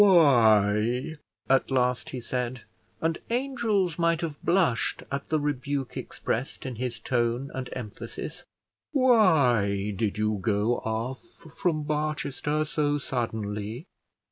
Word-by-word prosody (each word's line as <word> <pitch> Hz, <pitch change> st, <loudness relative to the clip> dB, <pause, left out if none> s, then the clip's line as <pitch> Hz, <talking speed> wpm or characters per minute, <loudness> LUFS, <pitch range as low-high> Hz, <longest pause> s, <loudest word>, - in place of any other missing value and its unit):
"Why," 120 Hz, -, +5 dB, 0.3 s
at 135 Hz, 0 st, +3 dB
last 125 Hz, +2 st, +1 dB
he 130 Hz, -6 st, -5 dB
said, 125 Hz, 0 st, -3 dB, 0.4 s
and 165 Hz, 0 st, 0 dB
angels 230 Hz, -, 0 dB
might 170 Hz, -1 st, +2 dB
have 155 Hz, -3 st, -5 dB
blushed 170 Hz, -10 st, +2 dB
at 140 Hz, 0 st, -3 dB
the 155 Hz, -, +2 dB
rebuke 140 Hz, -2 st, -2 dB
expressed 125 Hz, +4 st, -3 dB
in 130 Hz, -3 st, -5 dB
his 125 Hz, -1 st, -3 dB
tone 120 Hz, +2 st, 0 dB
and 130 Hz, -1 st, -4 dB
emphasis, 110 Hz, -5 st, -7 dB, 0.5 s
"Why 140 Hz, -, +4 dB
did 105 Hz, +1 st, -1 dB
you 105 Hz, -1 st, 0 dB
go 105 Hz, +3 st, +1 dB
off 115 Hz, +4 st, -3 dB, 0.3 s
from 155 Hz, -4 st, 0 dB
Barchester 150 Hz, 0 st, -1 dB
so 145 Hz, -1 st, 0 dB
suddenly? 110 Hz, -, -3 dB
130 Hz, 115 wpm, -27 LUFS, 115-155 Hz, 0.5 s, Why